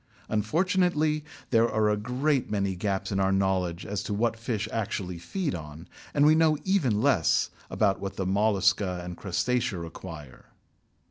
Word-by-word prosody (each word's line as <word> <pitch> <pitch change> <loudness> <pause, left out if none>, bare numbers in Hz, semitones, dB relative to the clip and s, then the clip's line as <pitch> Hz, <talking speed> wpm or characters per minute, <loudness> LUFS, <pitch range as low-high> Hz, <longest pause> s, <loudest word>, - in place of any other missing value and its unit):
Unfortunately 155 - +1 0.3
there 115 -1 +4
are 110 0 +2
a 105 - +3
great 125 +6 0
many 100 -2 0
gaps 95 +2 -2
in 95 - 0
our 95 0 +2
knowledge 95 -3 0
as 100 -1 -3
to 105 - -3
what 115 +2 +1
fish 115 -2 -3
actually 100 -5 -3
feed 170 - -3
on, 80 0 -8 0.3
and 145 0 +5
we 155 - +7
know 160 -1 +4
even 135 - +1
less 125 - +3 0.2
about 100 -2 +1
what 100 0 -5
the 95 - -2
Mollusca 100 -2 +2
and 90 0 -6
Crustacea 100 +4 -1
require. 80 -4 -9
105 Hz, 155 wpm, -27 LUFS, 95-125 Hz, 0.3 s, we